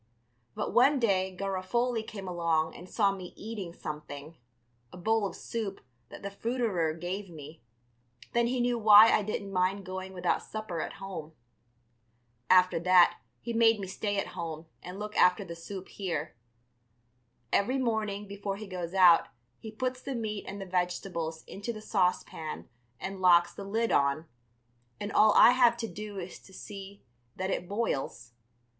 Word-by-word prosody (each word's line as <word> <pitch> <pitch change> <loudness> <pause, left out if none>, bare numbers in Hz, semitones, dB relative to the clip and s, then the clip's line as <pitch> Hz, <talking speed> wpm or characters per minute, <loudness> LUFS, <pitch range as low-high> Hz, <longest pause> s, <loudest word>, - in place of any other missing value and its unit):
But - - -3
one 275 +4 +5
day 190 -6 +1
Garofoli 200 +5 -1
came 200 -3 -8
along 165 -3 0
and 180 +1 -11
saw 200 -3 +2
me 185 -2 -8
eating 210 -5 -6
something, 150 -1 -8 0.6
a - - -11
bowl 220 +2 +1
of - - -9
soup 215 -4 -4 0.3
that - - -11
the 200 - -4
fruiterer 205 -7 -1
gave 180 +4 -5
me, 155 -1 -11 0.7
then 235 0 +3
he 250 +1 -1
knew 240 -1 +1
why 215 +1 +9
I - - +4
didn't 200 -1 -4
mind 185 +2 +1
going 185 0 -6
without 180 -1 0
supper 215 -7 -5
at - - -4
home. 180 -5 -7 1.2
After 185 -2 +5
that 180 +1 +5 0.2
he 235 - -4
made 225 -1 +4
me 195 - -4
stay 205 +2 -3
at 195 - -1
home 165 -2 -5 0.2
and 180 +2 -8
look 210 +1 -6
after 180 +2 +4
the 170 -1 -7
soup 190 +3 -8
here. 165 -8 -4 1.2
Every 250 +7 +2
morning 220 -5 -1
before 200 0 -4
he 215 - -7
goes 180 -2 -5
out 180 -3 +7 0.3
he 220 - -8
puts 255 +3 -3
the 275 - -4
meat 215 -3 -3
and 200 +1 -6
the 195 - -5
vegetables 180 -3 -2
into 205 +4 -5
the 215 - -7
saucepan 180 -6 -1 0.3
and 195 0 -5
locks 175 -1 +5
the 200 - -8
lid 225 +3 0
on, 140 +3 +2 0.7
and 205 0 -4
all 215 0 +5
I - - +9
have 245 -2 +4
to 230 -1 -3
do 210 -1 -7
is 180 -1 -7
to 190 - -18
see 200 0 -9 0.3
that 190 +1 -2
it 175 - -3
boils. 135 - -3
195 Hz, 165 wpm, -30 LUFS, 175-215 Hz, 1.2 s, why